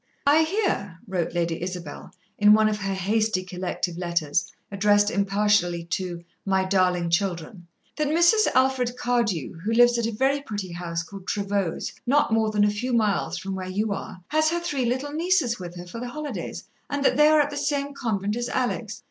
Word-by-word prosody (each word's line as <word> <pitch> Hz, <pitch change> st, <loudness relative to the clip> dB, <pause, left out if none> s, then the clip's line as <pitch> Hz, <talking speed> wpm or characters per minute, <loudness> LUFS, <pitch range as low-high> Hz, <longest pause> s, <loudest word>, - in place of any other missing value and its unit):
"I 295 Hz, +3 st, +5 dB
hear," 320 Hz, -, -1 dB
wrote 180 Hz, -4 st, -2 dB
Lady 170 Hz, -1 st, -1 dB
Isabel, 180 Hz, -4 st, -6 dB, 0.3 s
in 210 Hz, 0 st, +7 dB
one 215 Hz, 0 st, +4 dB
of 210 Hz, -1 st, -1 dB
her 195 Hz, -1 st, -2 dB
hasty, 205 Hz, +1 st, 0 dB
collective 180 Hz, -1 st, -4 dB
letters, 170 Hz, -3 st, -1 dB, 0.2 s
addressed 205 Hz, +1 st, +3 dB
impartially 200 Hz, -4 st, +1 dB
to 175 Hz, -1 st, -3 dB, 0.2 s
"My 190 Hz, -1 st, +1 dB
darling 180 Hz, -3 st, +1 dB
Children," 175 Hz, -1 st, -2 dB, 0.3 s
"that 305 Hz, -1 st, +1 dB
Mrs. 345 Hz, +8 st, +4 dB
Alfred 255 Hz, -2 st, +2 dB
Cardew, 220 Hz, -, -1 dB
who 205 Hz, +7 st, -3 dB
lives 240 Hz, +1 st, +5 dB
at 230 Hz, -, 0 dB
a -, -, -2 dB
very 270 Hz, +5 st, +1 dB
pretty 205 Hz, -8 st, -5 dB
house 170 Hz, -1 st, -4 dB
called 195 Hz, +2 st, -11 dB
Trevose, 200 Hz, -4 st, -2 dB
not 280 Hz, -3 st, +3 dB
more 220 Hz, -1 st, +2 dB
than 210 Hz, -1 st, +2 dB
a 205 Hz, -, +3 dB
few 245 Hz, +5 st, -3 dB
miles 215 Hz, -4 st, +1 dB
from 195 Hz, 0 st, -5 dB
where 185 Hz, -1 st, -5 dB
you 205 Hz, +2 st, -1 dB
are, 185 Hz, -, -7 dB
has 310 Hz, +1 st, +3 dB
her 345 Hz, +1 st, 0 dB
three 290 Hz, -7 st, -2 dB
little 260 Hz, +4 st, -1 dB
nieces 315 Hz, -, +1 dB
with 175 Hz, -1 st, -8 dB
her 175 Hz, 0 st, -8 dB
for 180 Hz, +6 st, -8 dB
the 245 Hz, +1 st, -5 dB
holidays, 300 Hz, +2 st, -5 dB, 0.3 s
and 285 Hz, -1 st, -2 dB
that -, -, +4 dB
they 300 Hz, +2 st, +6 dB
are 310 Hz, 0 st, +5 dB
at 290 Hz, 0 st, +2 dB
the -, -, -5 dB
same 285 Hz, 0 st, -1 dB
convent 210 Hz, -6 st, -2 dB
as 240 Hz, +1 st, -3 dB
Alex. 235 Hz, -4 st, -2 dB
210 Hz, 190 wpm, -25 LUFS, 185-260 Hz, 0.3 s, in